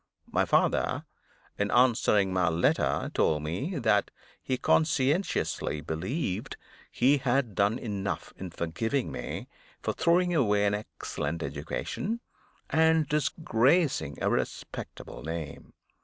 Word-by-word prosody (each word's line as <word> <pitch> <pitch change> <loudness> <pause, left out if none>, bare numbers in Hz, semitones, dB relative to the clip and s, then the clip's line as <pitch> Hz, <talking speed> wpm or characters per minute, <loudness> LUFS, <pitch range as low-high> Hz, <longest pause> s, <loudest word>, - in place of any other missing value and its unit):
My - - +2
father, - - +2 0.5
in 105 0 +1
answering 110 -6 +3
my 90 -3 +3
letter, 80 +1 +1
told 75 -1 +2
me 95 - -3
that 110 -5 +2 0.3
he 130 - -1
conscientiously 150 - +1
believed 95 - -3 0.3
he 140 +4 +3
had 130 -3 +1
done 100 +5 +2
enough 105 -5 -4
in 95 - -6
forgiving 110 - -2
me - - -5 0.4
for - - 0
throwing 175 +1 +3
away 105 -9 +3
an 100 - +2
excellent 85 -5 -4
education, 225 +3 -3 0.5
and 160 -1 +4
disgracing 150 +1 +1
a - - +2
respectable - - -4
name. 80 -1 -6
115 Hz, 110 wpm, -29 LUFS, 95-145 Hz, 0.5 s, and